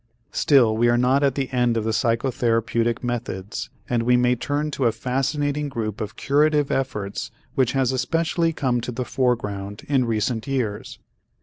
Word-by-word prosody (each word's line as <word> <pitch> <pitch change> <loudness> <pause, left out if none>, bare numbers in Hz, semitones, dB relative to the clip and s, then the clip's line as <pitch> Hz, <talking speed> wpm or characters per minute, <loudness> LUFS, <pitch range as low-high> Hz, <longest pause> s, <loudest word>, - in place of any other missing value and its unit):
Still 125 -7 +4
we 120 +2 +3
are 120 - +3
not 130 +3 +3
at 140 -3 +2
the 135 -2 -1
end 120 -2 +2
of 110 - 0
the 110 - 0
psychotherapeutic 115 0 0
methods 115 -3 -4 0.2
and 120 -1 +1
we 125 +1 +3
may 125 0 +3
turn 145 +5 -2
to 135 -2 -1
a - - +3
fascinating 145 +4 -1
group 110 -5 -4
of 110 +2 -5
curative 150 0 +2
efforts 105 -7 -2 0.2
which 130 -3 +1
has 135 -2 +2
especially 165 +6 0
come 125 -6 0
to 125 - -4
the 125 +1 -3
foreground 105 -6 -2
in 135 -3 +2
recent 115 +2 -1
years. 120 -7 -3
125 Hz, 170 wpm, -23 LUFS, 115-135 Hz, 0.2 s, Still